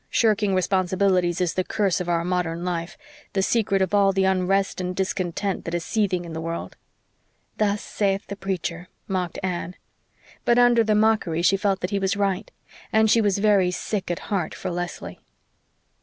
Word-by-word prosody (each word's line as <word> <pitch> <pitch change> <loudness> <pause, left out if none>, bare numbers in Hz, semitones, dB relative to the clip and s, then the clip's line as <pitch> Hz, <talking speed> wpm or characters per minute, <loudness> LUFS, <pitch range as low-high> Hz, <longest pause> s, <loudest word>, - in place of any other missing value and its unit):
Shirking 210 -3 +2
responsibilities 185 -1 +1
is 175 -3 +1
the 185 - 0
curse 195 -2 0
of 175 - -4
our 170 -1 +1
modern 175 -1 -1
life 170 -2 -3 0.4
the 195 -1 +1
secret 195 -3 +2
of 190 - -3
all 200 -1 +5
the 195 0 +1
unrest 190 +1 +1
and 180 0 -3
discontent 190 0 -2
that 170 - -3
is 170 - -3
seething 195 -5 0
in 165 - -8
the 160 - -4
world." 165 +1 -5 0.8
"Thus 205 -1 +1
saith 195 -1 -1
the 200 - -6
preacher," 180 -3 -4 0.2
mocked 180 -3 -2
Anne. 180 -1 -3 0.7
But 240 - +3
under 245 -1 +5
the 215 -1 +2
mockery 210 -6 +2
she 190 +3 +4
felt 195 -1 0
that 180 - -2
he 200 - 0
was 195 0 0
right; 195 -2 -1 0.4
and 220 0 +4
she 230 - +5
was 205 -2 +2
very 200 -3 +3
sick 190 +2 -3
at 175 +4 -4
heart 180 -5 -1
for - - -4
Leslie. 175 0 -5
190 Hz, 180 wpm, -24 LUFS, 175-200 Hz, 0.8 s, all